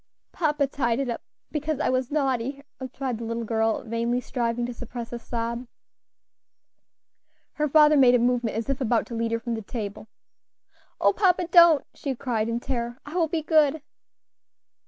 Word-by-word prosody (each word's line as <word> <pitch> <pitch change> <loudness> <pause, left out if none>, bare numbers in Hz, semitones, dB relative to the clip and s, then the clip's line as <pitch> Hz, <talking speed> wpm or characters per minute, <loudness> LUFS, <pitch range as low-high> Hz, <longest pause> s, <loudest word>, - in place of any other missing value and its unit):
"Papa 300 -4 +1
tied 255 -3 -1
it 270 -3 -1
up, 230 - -5 0.3
because 300 -1 -2
I - - +1
was 255 -1 0
naughty," 275 -2 -1 0.2
replied 260 -2 -4
the - - -5
little 230 +1 -3
girl, 225 0 0
vainly 235 +1 -1
striving 240 -1 -2
to 245 - -5
suppress 240 0 -7
a 240 - -4
sob. 235 +1 -4 1.9
Her 300 0 -1
father 300 +1 +6
made 255 -3 +6
a - - +6
movement 240 -2 0
as 225 - -3
if 275 0 -2
about 235 -2 +1
to 245 - -9
lead 230 0 -1
her 230 - 0
from 235 +1 -4
the 225 - -3
table. 210 -1 -6 0.9
"O - - +4
papa! 365 -3 +2
don't" 340 -4 +7
she 275 -2 -4
cried, 230 -3 -1
in 230 +1 -1
terror; 240 -1 -4
"I 295 - -9
will 345 -2 +2
be 320 0 -2
good." 310 -2 +3
245 Hz, 175 wpm, -25 LUFS, 230-290 Hz, 1.9 s, don't